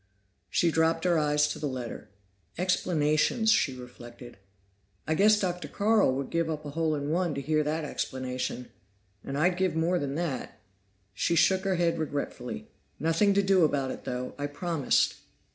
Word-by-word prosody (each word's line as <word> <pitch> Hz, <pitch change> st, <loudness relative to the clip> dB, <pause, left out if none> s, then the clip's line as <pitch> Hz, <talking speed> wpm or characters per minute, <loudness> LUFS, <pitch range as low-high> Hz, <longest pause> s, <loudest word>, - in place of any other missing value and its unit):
She 170 Hz, -, +2 dB
dropped 160 Hz, +1 st, +2 dB
her 175 Hz, -3 st, +3 dB
eyes 150 Hz, 0 st, +2 dB
to -, -, -4 dB
the 150 Hz, -, -2 dB
letter. 125 Hz, -3 st, -6 dB, 0.5 s
"Explanations," 180 Hz, +4 st, +2 dB
she 130 Hz, -, +2 dB
reflected. 120 Hz, -1 st, -11 dB, 0.7 s
"I 155 Hz, -, 0 dB
guess 210 Hz, +5 st, +5 dB
Dr. 180 Hz, -5 st, -2 dB
Carl 205 Hz, -5 st, +2 dB
would 135 Hz, 0 st, -4 dB
give 165 Hz, -1 st, 0 dB
up 155 Hz, -1 st, -4 dB
a 145 Hz, -, -5 dB
hole 160 Hz, 0 st, 0 dB
in 145 Hz, 0 st, -3 dB
one 170 Hz, -2 st, 0 dB
to -, -, -2 dB
hear 155 Hz, +2 st, +1 dB
that 155 Hz, +1 st, -2 dB
explanation. 130 Hz, -2 st, -4 dB, 0.5 s
And 135 Hz, -, -4 dB
I'd 175 Hz, +4 st, +2 dB
give 185 Hz, -3 st, 0 dB
more 170 Hz, +2 st, +1 dB
than 140 Hz, -2 st, -3 dB
that." 155 Hz, -9 st, -4 dB, 0.5 s
She 170 Hz, -, 0 dB
shook 190 Hz, +3 st, +3 dB
her 190 Hz, -1 st, +1 dB
head 170 Hz, -1 st, +1 dB
regretfully. 130 Hz, -, -4 dB, 0.3 s
"Nothing 165 Hz, +6 st, +2 dB
to 200 Hz, -, +3 dB
do 195 Hz, -2 st, +4 dB
about 140 Hz, -3 st, +1 dB
it, -, -, -8 dB
though. 125 Hz, 0 st, -4 dB
I 145 Hz, -, -1 dB
promised." 145 Hz, -1 st, 0 dB
155 Hz, 170 wpm, -28 LUFS, 140-175 Hz, 0.7 s, guess